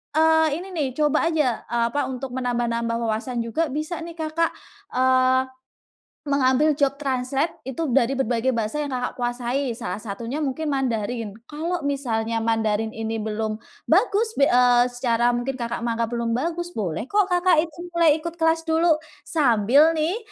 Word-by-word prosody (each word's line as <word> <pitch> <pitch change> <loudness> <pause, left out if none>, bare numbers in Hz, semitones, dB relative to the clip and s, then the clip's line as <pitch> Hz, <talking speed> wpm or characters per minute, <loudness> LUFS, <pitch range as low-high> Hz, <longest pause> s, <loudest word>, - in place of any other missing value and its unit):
eee, 320 0 +5 0.2
ini - - -10
nih, 310 -6 -1
coba 300 +2 +2
aja, 300 -8 +1
eee, 235 -1 +1
apa, 290 - -1
untuk 260 0 -5
menambah-nambah 235 -2 -1
wawasan 230 +2 -2
juga 310 +8 -1
bisa 305 +5 -4
nih, 335 0 -8
Kakak, 320 0 -1 0.4
eee, 260 0 +4 0.8
mengambil 280 +2 +3
job 280 -1 0
translate 270 +3 -1
itu 265 +5 -3
dari 270 0 +2
berbagai 245 0 +1
bahasa 230 +4 -1
yang 290 - -4
Kakak 250 -1 -3
kuasai, 245 +2 -2
salah 215 -3 -5
satunya 230 +8 -4
mungkin 290 +3 -2
Mandarin. 230 -4 -2 0.2
Kalau 325 +1 -3
misalnya 230 -5 -1
Mandarin 225 -1 0
ini 225 0 -4
belum 215 0 -2 0.3
bagus, 435 +5 +2
be 280 - 0
eee, 245 0 +4
secara 240 -1 +1
mungkin 245 +2 -2
Kakak 235 -2 -3
menganggap 230 -1 -1
belum 235 -1 -1
bagus, 345 +6 -3
boleh 200 +1 -3
kok 405 +1 +1
Kakak 355 -3 +4
itu 330 -1 -8 0.2
mulai 335 -2 +5
ikut 335 +1 -6
kelas 325 0 +1
dulu, 320 -1 +3 0.2
sambil 275 +2 +4
nih, 325 +7 0
260 Hz, 155 wpm, -23 LUFS, 235-315 Hz, 0.8 s, eee